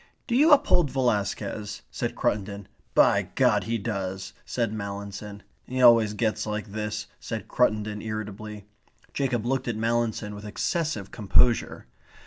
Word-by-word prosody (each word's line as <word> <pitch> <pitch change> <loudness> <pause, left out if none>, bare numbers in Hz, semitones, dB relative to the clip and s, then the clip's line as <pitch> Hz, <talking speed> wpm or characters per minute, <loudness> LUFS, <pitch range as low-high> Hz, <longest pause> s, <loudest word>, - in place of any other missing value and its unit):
"Do 240 - -1
you 305 +5 +5
uphold 175 - +5
Velasquez?" 105 -4 -1
said - - -3
Cruttendon. 100 -1 -1 0.3
"By - - +4
God, 105 -2 +3
he 115 +1 0
does," 95 -3 -4
said 115 -3 -1
Mallinson. 100 0 -6 0.2
"He 130 +1 -3
always 115 -4 +6
gets 110 +1 0
like 105 0 -4
this," 105 +1 -3
said 110 -1 -5
Cruttendon 110 -3 +1
irritably. 105 -1 -6 0.5
Jacob 125 -5 -1
looked 130 +1 -1
at 120 - -1
Mallinson 115 -2 0
with 105 0 -9
excessive 110 - -2
composure. 115 +2 +2
110 Hz, 130 wpm, -26 LUFS, 105-120 Hz, 0.5 s, always